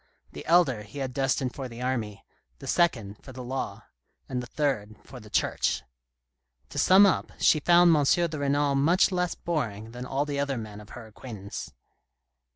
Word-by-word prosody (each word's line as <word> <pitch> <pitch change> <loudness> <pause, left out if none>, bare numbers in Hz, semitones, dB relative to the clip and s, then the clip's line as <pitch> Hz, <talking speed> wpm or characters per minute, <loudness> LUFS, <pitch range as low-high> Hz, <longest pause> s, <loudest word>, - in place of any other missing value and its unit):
The - - -8
elder 160 -9 +4
he 105 +6 -12
had 135 -2 -3
destined 130 -1 0
for 135 -2 -6
the 115 0 -10
army, 115 -6 -3 0.3
the - - -11
second 115 - 0
for 130 - -10
the 130 0 -8
law, 130 +2 -4 0.4
and 125 -1 -3
the 125 - -8
third 125 -9 -2
for 130 - -11
the 105 -2 -14
Church. - - 0 0.9
To - - -4
sum 190 +3 +7
up, 195 - +1
she 155 - +4
found 175 +2 +5
M. 150 - +3
de 160 +1 +1
Renal 140 0 +1
much 160 +8 +3
less 180 -1 -1
boring 115 -10 -3
than 125 +1 -7
all 140 +3 -1
the 145 -1 -3
other 140 -2 -1
men 105 -2 -7
of 105 - -15
her 120 - -9
acquaintance. 110 -2 -8
135 Hz, 180 wpm, -27 LUFS, 115-150 Hz, 0.9 s, sum